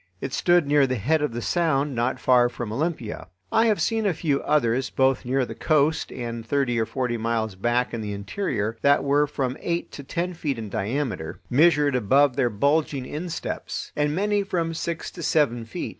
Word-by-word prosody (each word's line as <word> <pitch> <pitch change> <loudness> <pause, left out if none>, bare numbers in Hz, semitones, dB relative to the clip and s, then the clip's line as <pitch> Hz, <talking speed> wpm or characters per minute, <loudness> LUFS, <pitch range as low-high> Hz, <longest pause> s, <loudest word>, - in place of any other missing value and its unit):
It 135 +3 -5
stood 175 -2 +3
near 145 -1 +4
the 130 - -1
head 145 +9 +1
of 150 - 0
the 120 0 -5
Sound 150 -5 +1
not 120 +2 -1
far 125 -2 +4
from 120 -3 -5
Olympia. 145 -4 -3 0.2
I 225 +1 +4
have 215 -2 +2
seen 225 -2 +1
a 185 - +1
few 145 -3 0
others, 130 -4 +1
both 130 -1 +1
near 130 +1 +1
the - - -7
coast 155 0 +1
and 115 -2 -5
thirty 120 -1 0
or 110 - 0
forty 125 -3 -2
miles 115 -2 -1
back 120 +6 0
in 115 - -3
the 105 -1 -4
interior, 110 - -3
that 140 0 +4
were 145 +1 +3
from 135 -3 -2
eight 170 0 -2
to 140 - -8
ten 175 +6 -3
feet 150 -6 -3
in 110 -2 -6
diameter, 110 - -3
measured 145 0 +4
above 130 +3 +3
their 130 -3 +2
bulging 140 +4 +1
insteps; 165 +5 -5
and 150 0 0
many 205 +2 +1
from 170 -4 -2
six 165 0 -4
to 175 - -9
seven 140 -8 +1
feet. 110 - -5
135 Hz, 195 wpm, -24 LUFS, 120-155 Hz, 0.2 s, near